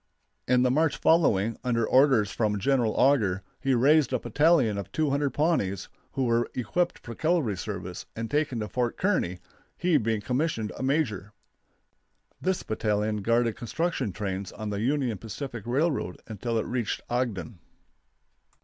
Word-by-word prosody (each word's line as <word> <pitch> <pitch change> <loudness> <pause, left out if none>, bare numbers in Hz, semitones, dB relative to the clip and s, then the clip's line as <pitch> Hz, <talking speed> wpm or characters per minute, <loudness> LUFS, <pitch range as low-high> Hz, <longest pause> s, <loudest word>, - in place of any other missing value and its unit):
In 125 0 +4
the 125 - +3
March 155 +3 +2
following, 115 - +3
under 115 -3 +1
orders 130 -7 +4
from 105 -2 0
General 120 +1 +1
Auger, 105 -9 +2 0.2
he 135 -2 +1
raised 140 +3 +4
a 130 - +2
battalion 125 -3 +2
of 100 - -7
200 145 -2 +1
Pawnees, 145 - 0 0.2
who 135 - 0
were 115 0 +1
equipped 170 +9 0
for 115 - -9
cavalry 155 - +1
service 90 -2 -6
and 115 0 -5
taken 145 -6 0
to 105 - -3
Fort 120 +1 -2
Kearney, 180 - 0 0.4
he 175 -3 +3
being 110 -2 0
commissioned 125 -2 -1
a - - -7
major. 125 - -1 1.1
This 190 0 0
battalion 105 -1 -1
guarded 115 +2 +1
construction 140 - -2
trains 95 0 -4
on 110 -1 -5
the 100 0 -2
Union 125 -4 0
Pacific 120 +1 -6
Railroad 135 - 0
until 115 +2 -3
it 110 - 0
reached 120 -4 -2
Ogden. 120 -5 -2
120 Hz, 150 wpm, -27 LUFS, 105-140 Hz, 1.1 s, In